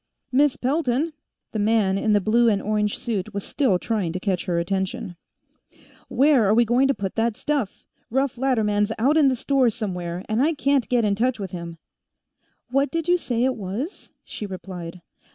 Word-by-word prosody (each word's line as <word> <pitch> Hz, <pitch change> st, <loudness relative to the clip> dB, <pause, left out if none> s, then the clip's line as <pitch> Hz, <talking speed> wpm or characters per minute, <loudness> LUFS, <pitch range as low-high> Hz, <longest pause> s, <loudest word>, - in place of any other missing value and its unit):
"Miss 280 Hz, +1 st, +3 dB
Pelton!" 280 Hz, +2 st, 0 dB, 0.4 s
The 220 Hz, -, -3 dB
man 205 Hz, -2 st, +2 dB
in 210 Hz, +2 st, +1 dB
the 205 Hz, -, +5 dB
blue 230 Hz, +4 st, +3 dB
and 205 Hz, -2 st, +2 dB
orange 210 Hz, 0 st, -1 dB
suit 215 Hz, -2 st, -4 dB
was 200 Hz, -, -2 dB
still 255 Hz, -11 st, +1 dB
trying 200 Hz, -3 st, -2 dB
to 185 Hz, -, -3 dB
catch 185 Hz, -2 st, -1 dB
her 175 Hz, -3 st, 0 dB
attention. 190 Hz, +3 st, -2 dB, 0.9 s
"Where 275 Hz, -3 st, +4 dB
are 210 Hz, -, +4 dB
we 240 Hz, +1 st, +5 dB
going 245 Hz, +4 st, +3 dB
to 275 Hz, -, +1 dB
put 195 Hz, -2 st, -4 dB
that 225 Hz, -1 st, +1 dB
stuff? 280 Hz, -9 st, -2 dB, 0.2 s
Russ 265 Hz, +1 st, 0 dB
Latterman's 215 Hz, -5 st, +1 dB
out 270 Hz, +7 st, +3 dB
in 305 Hz, -3 st, +5 dB
the 260 Hz, -, +2 dB
store, 265 Hz, 0 st, +2 dB
somewhere, 180 Hz, -5 st, -4 dB
and 220 Hz, +3 st, +1 dB
I 315 Hz, +3 st, +2 dB
can't 280 Hz, -2 st, +1 dB
get 240 Hz, -3 st, +2 dB
in 205 Hz, -, +2 dB
touch 240 Hz, +3 st, 0 dB
with 195 Hz, -3 st, -5 dB
him." 170 Hz, -2 st, -7 dB, 0.9 s
"What 275 Hz, +2 st, +2 dB
did 330 Hz, -1 st, -3 dB
you 355 Hz, -, +5 dB
say 245 Hz, -8 st, -1 dB
it 260 Hz, 0 st, +1 dB
was?" 220 Hz, -, -6 dB
she 210 Hz, -, -7 dB
replied. 180 Hz, -2 st, -8 dB
225 Hz, 190 wpm, -23 LUFS, 195-265 Hz, 0.9 s, the